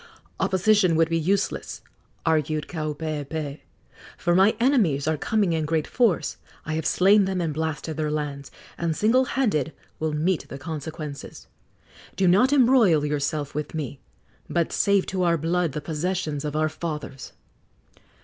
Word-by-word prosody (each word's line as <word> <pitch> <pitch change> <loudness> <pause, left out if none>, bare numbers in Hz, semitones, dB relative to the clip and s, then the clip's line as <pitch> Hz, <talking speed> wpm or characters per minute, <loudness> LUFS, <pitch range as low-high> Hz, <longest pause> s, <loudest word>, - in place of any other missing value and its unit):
"Opposition 190 -2 +3
would 165 0 +3
be 165 - +1
useless," 190 +5 -1 0.4
argued 155 -2 0
Kaupeepee, 155 -2 -4 0.6
"for 175 - +1
my 190 +4 +5
enemies 210 - +2
are 160 - +2
coming 200 +2 0
in 160 -1 0
great 155 0 0
force. 230 -9 +1 0.3
I 155 - -3
have 160 0 -1
slain 200 +2 +5
them 190 -1 -2
and 165 -3 -1
blasted 160 0 -3
their 155 -1 -1
lands, 145 -2 -4 0.3
and 165 -2 0
single 245 +7 +3
handed 205 - 0 0.3
will 155 0 -1
meet 165 +3 0
the 135 - -6
consequences. 150 0 -7 0.7
Do 190 - +2
not 205 +10 +5
embroil 235 - +5
yourself 145 0 -2
with 150 +2 -4
me, 145 -3 -4 0.5
but 170 -2 0
save 200 -1 +3
to 185 -1 -2
our 170 -1 +3
blood 165 0 0
the 150 - -4
possessions 160 -2 -2
of 150 0 -3
our 155 0 +2
fathers." 150 -4 -6
160 Hz, 150 wpm, -24 LUFS, 150-185 Hz, 0.7 s, my